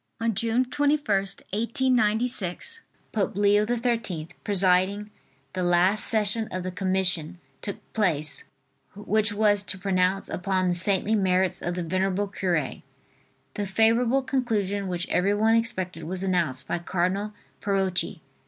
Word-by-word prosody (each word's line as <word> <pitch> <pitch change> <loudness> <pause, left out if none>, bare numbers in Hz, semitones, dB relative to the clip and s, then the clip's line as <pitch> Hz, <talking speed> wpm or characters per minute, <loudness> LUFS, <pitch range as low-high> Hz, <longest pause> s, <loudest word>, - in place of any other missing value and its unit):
On 230 0 0
June 230 +5 +1
21st, 255 -9 0
1896, 230 - 0 0.3
Pope 205 -3 -1
Leo 205 +1 +3
XIII, 230 -9 -2
presiding, 195 +1 +2 0.4
the 185 - -3
last 180 +4 +3
session 220 0 +4
of 185 -1 -4
the 185 - -4
commission 185 -3 +1 0.2
took 200 - -5 0.2
place, 155 -9 0 0.5
which 215 +1 0
was 205 -1 +2
to 200 -1 -5
pronounce 185 0 0
upon 185 0 -1
the - - +1
saintly 195 +4 +1
merits 190 -3 +1
of 175 0 -3
the 180 - -3
venerable 185 +3 0
cure. 175 -7 -2 0.7
The 205 -1 -3
favorable 230 +6 +2
conclusion 210 -7 -1
which 180 0 -3
everyone 205 +4 +2
expected 185 -8 -1
was 185 +3 -3
announced 170 -9 0
by - - -2
Cardinal 185 +4 -1 0.3
Parocchi. 195 -2 -1
195 Hz, 125 wpm, -25 LUFS, 185-220 Hz, 0.7 s, session